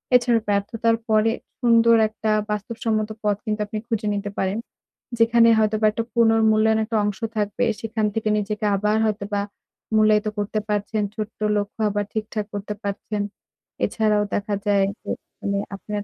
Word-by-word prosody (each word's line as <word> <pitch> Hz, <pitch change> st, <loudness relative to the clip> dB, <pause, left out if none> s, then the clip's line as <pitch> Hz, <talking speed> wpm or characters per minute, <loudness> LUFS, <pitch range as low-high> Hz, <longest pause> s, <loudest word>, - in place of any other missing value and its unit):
এছাড়াও 240 Hz, -2 st, +4 dB
ব্যার্থতার 225 Hz, +3 st, +1 dB
পরে 215 Hz, +1 st, +4 dB, 0.3 s
সুন্দর 230 Hz, -1 st, +5 dB
একটা 220 Hz, 0 st, -3 dB, 0.2 s
বাস্তবসম্মত 215 Hz, +1 st, -2 dB
পথ 210 Hz, -1 st, +2 dB
কিন্তু 215 Hz, -1 st, -1 dB
আপনি 210 Hz, +1 st, -5 dB
খুঁজে 220 Hz, -2 st, -1 dB
নিতে 205 Hz, 0 st, -3 dB
পারেন। 190 Hz, +2 st, 0 dB, 0.6 s
যেখানে 230 Hz, 0 st, +5 dB
হয়তোবা 215 Hz, 0 st, +2 dB
একটা 225 Hz, +2 st, -2 dB
পুনর্মূল্যায়ন 220 Hz, -1 st, +4 dB
একটা 225 Hz, 0 st, -1 dB
অংশ 205 Hz, -2 st, -2 dB, 0.2 s
থাকবে, 210 Hz, +4 st, 0 dB
সেখান 220 Hz, -1 st, -1 dB
থেকে 220 Hz, 0 st, -1 dB
নিজেকে 210 Hz, +1 st, -2 dB
আবার 210 Hz, +2 st, +1 dB
হয়তোবা 205 Hz, -1 st, -1 dB, 0.5 s
মূল্যায়িত 215 Hz, 0 st, +4 dB
করতে 205 Hz, +1 st, -1 dB
পারছেন। 210 Hz, +1 st, -1 dB
ছোট্ট 215 Hz, 0 st, -5 dB, 0.2 s
লক্ষ্য 205 Hz, +2 st, -4 dB
আবার 205 Hz, 0 st, -1 dB
ঠিকঠাক 215 Hz, -1 st, -3 dB
করতে 205 Hz, +1 st, -4 dB
পারছেন। 205 Hz, +1 st, -3 dB, 0.6 s
এছাড়াও 215 Hz, -2 st, +1 dB
দেখা 205 Hz, 0 st, -1 dB
যায় 200 Hz, -1 st, +3 dB, 0.2 s
যে -, -, -9 dB, 0.3 s
মানে 200 Hz, 0 st, -1 dB, 0.2 s
আপনার 205 Hz, +1 st, -5 dB
215 Hz, 145 wpm, -23 LUFS, 205-225 Hz, 0.6 s, সুন্দর